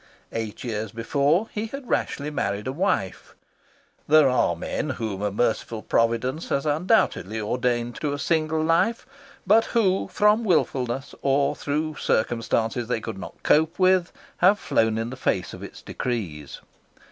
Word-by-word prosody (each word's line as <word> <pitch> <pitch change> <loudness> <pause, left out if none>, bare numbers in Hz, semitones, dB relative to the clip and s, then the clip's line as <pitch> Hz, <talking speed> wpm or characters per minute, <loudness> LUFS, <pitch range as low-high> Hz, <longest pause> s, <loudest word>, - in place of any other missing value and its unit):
Eight 110 -2 -5
years 110 -2 -3
before 140 - +1
he 215 +1 -3
had 275 +2 -8
rashly 150 -8 -1
married 100 -7 -2
a 130 - -2
wife. 140 - -2 0.7
There 155 -1 +6
are 125 -1 +2
men - - -3
whom 105 -4 -3
a 105 - 0
merciful 110 +1 -1
Providence 115 +6 0
has 140 +1 0
undoubtedly 150 - +1
ordained 120 +2 -1
to 150 - 0
a 145 - -2
single 155 +1 0
life, 170 +8 +2 0.4
but 220 +4 +5
who 195 -5 +1
from 210 +4 +3
wilfulness 135 - 0
or 140 0 +2
through 150 +1 -2
circumstances 115 +1 0
they 125 - 0
could 110 -3 -6
not - - -10
cope 160 +2 +3
with 185 -2 +3 0.3
have 190 +4 +5
flown 110 - +1
in 115 +2 -3
the - - -6
face - - -1
of - - -9
its - - -10
decrees. 90 - -4
135 Hz, 150 wpm, -24 LUFS, 115-165 Hz, 0.7 s, There